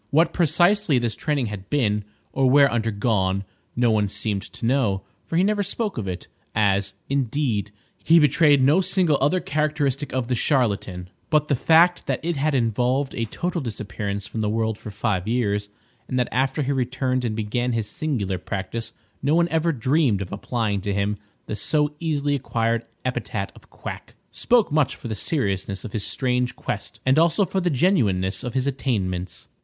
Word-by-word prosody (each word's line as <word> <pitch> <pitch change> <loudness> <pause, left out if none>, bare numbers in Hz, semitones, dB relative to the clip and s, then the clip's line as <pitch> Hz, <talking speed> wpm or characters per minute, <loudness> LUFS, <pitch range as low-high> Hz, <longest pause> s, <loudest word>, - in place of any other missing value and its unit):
What 160 +4 +3
precisely 175 0 +3
this 120 -3 0
training 145 -5 -1
had 105 -3 -7
been, 105 -8 +1 0.3
or 135 -1 +3
where 140 +1 +6
undergone, 105 -4 0 0.3
no 120 -1 +3
one 105 -2 +2
seemed 100 0 -2
to 115 - -8
know,—for 120 - -1
he 180 - +4
never 205 +1 +2
spoke 205 - -2
of 100 - -4
it, 90 -1 -5 0.3
as, 100 -1 +1
indeed, 130 -6 0 0.3
he 165 - +6
betrayed 150 -2 +5
no 150 +8 +5
single 180 -6 +2
other 145 +7 +3
characteristic 150 -3 -1
of 130 -2 -1
the 125 - 0
charlatan,—but 115 - 0
the 140 - +3
fact 165 +6 +4
that - - 0
it 170 0 0
had 145 +1 +1
involved 125 +3 +1
a 115 - -2
total 175 +9 -3
disappearance 100 -3 -4
from 110 +1 -4
the 105 - 0
world 110 0 -1
for - - -8
five 105 -2 -1
years, 105 -4 0 0.4
and 130 - -2
that 125 - +1
after 135 +4 +1
he 140 - -1
returned 130 -1 0
and 115 -3 -1
began 120 +3 -1
his 115 -2 -1
singular 130 - -2
practice 110 +4 -5 0.3
no 145 +3 +2
one 170 0 +4
ever 165 0 +1
dreamed 130 -5 +1
of 90 - -11
applying 105 0 -2
to 100 +1 -2
him 100 +1 0 0.3
the 105 - -4
so 150 +5 0
easily 145 -3 0
acquired 115 -4 0 0.2
epithet 110 -5 -3
of - - -18
quack, - - -8 0.2
spoke 235 -7 +2
much 150 -2 +2
for - - -8
the 110 - -3
seriousness 100 - -1
of 105 - -7
his 105 - -2
strange 125 +1 0
quest 100 0 -5
and 130 +4 +4
also 170 +5 +3
for 190 +1 -1
the 175 - +1
genuineness 105 - +1
of 125 0 -5
his 130 0 +1
attainments. 95 -10 -2
125 Hz, 175 wpm, -23 LUFS, 105-150 Hz, 0.4 s, where